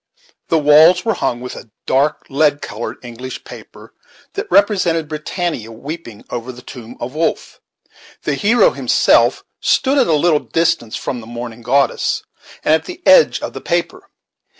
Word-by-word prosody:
The 165 - +2
walls 155 +4 +6
were 225 - +2
hung 120 -9 -2
with 125 - -7
a 115 - -11 0.2
dark 140 +3 +1
lead 145 +1 +2
colored 110 +3 -6
English 125 +2 -8
paper - - -13 0.4
that - - -5
represented 185 -5 +2
Britannia 155 - -4
weeping 120 -2 -8
over 120 +1 -4
the 125 0 -13
tomb 120 -1 -11
of 125 +3 -5
Wolfe, 160 +2 -2 0.6
The 150 - -1
hero 230 - +3
himself - - +3 0.2
stood 275 +1 +2
at 255 - +3
a 165 - +2
little 155 0 +3
distance 155 -10 -1
from 125 - -4
the 110 - -12
mourning 120 0 -7
goddess, 135 +4 +1 0.4
and 155 - +4
at 160 - +1
the 360 0 -9
edge - - +5
of - - -5
the - - -7
paper. - - -2
150 Hz, 160 wpm, -17 LUFS, 120-170 Hz, 0.6 s, walls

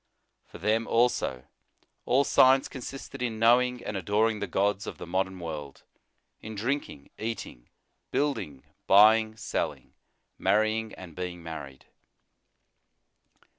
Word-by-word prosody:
For - - -11
them, 110 +2 0
also, 115 - +1 0.6
all 135 +3 +4
science 135 0 +5
consisted 135 0 -8
in 115 -3 -2
knowing 125 +2 +3
and 105 - -4
adoring 105 +4 +1
the 100 - -3
gods 100 +2 0
of - - -6
the - - -7
modern 95 +1 -2
world; 75 -5 -7 0.6
in 110 0 -7
drinking, 115 - -3
eating, 110 - -6 0.4
building, 130 - -2 0.2
buying, 110 +2 +6
selling, - - -3 0.5
marrying, 110 +1 +1
and 85 -4 -11
being 90 -1 -5
married. 75 -5 -8
110 Hz, 115 wpm, -28 LUFS, 90-120 Hz, 0.6 s, buying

